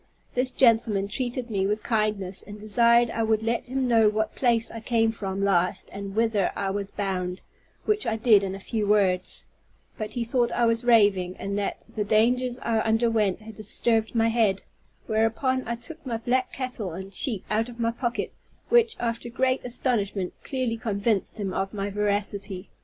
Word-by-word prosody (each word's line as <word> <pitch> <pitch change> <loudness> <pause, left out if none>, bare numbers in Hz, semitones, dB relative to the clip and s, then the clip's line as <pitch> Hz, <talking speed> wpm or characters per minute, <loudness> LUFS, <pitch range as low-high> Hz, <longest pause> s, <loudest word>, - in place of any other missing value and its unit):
This 250 +1 +1
gentleman 225 -6 +3
treated 245 +2 -4
me 195 -2 +1
with 210 +1 -1
kindness, 210 -4 0
and 205 +1 -10
desired 235 +2 +4
I 225 - -2
would 220 -1 +1
let 230 +2 -1
him 260 0 -1
know 225 -3 +5
what 215 +1 -1
place 230 -3 +1
I 225 - -6
came 225 0 +1
from 195 -2 -4
last 180 -2 +1
and 200 0 -6
whither 220 -4 +2
I 195 -1 -1
was 200 0 -3
bound; 185 -3 -3 0.5
which 425 0 +1
I 220 - +1
did 220 -2 +5
in 195 0 -3
few 210 +1 -3
words, 190 -3 +1 0.5
but 215 -1 -5
he 240 - 0
thought 240 +1 +1
I 240 - +2
was 230 +1 +1
raving, 205 -6 +4
and 200 0 -4
that 200 - -3
the 210 - -3
dangers 245 +4 +2
I 225 -1 +1
underwent 220 -3 +1
had 220 +1 -10
disturbed 220 +2 +1
my 225 0 +3
head; 220 -4 +1 0.4
whereupon 225 +4 0
I 235 - -1
took 325 +7 -9
my 240 -4 -3
black 255 +3 0
cattle 250 -8 -4
and 190 +3 -8
sheep 220 -1 +1
out 225 +3 +1
of 240 -1 -12
my 230 0 +1
pocket, 235 0 -3 0.4
which, 470 -1 +4
after 235 0 -3
great 255 +2 0
astonishment, 215 -7 -1
clearly 255 -4 -2
convinced 215 -1 -1
him 195 -2 -2
of 195 +2 -2
my 200 0 -3
veracity. 200 -1 -1
220 Hz, 180 wpm, -26 LUFS, 200-235 Hz, 0.5 s, know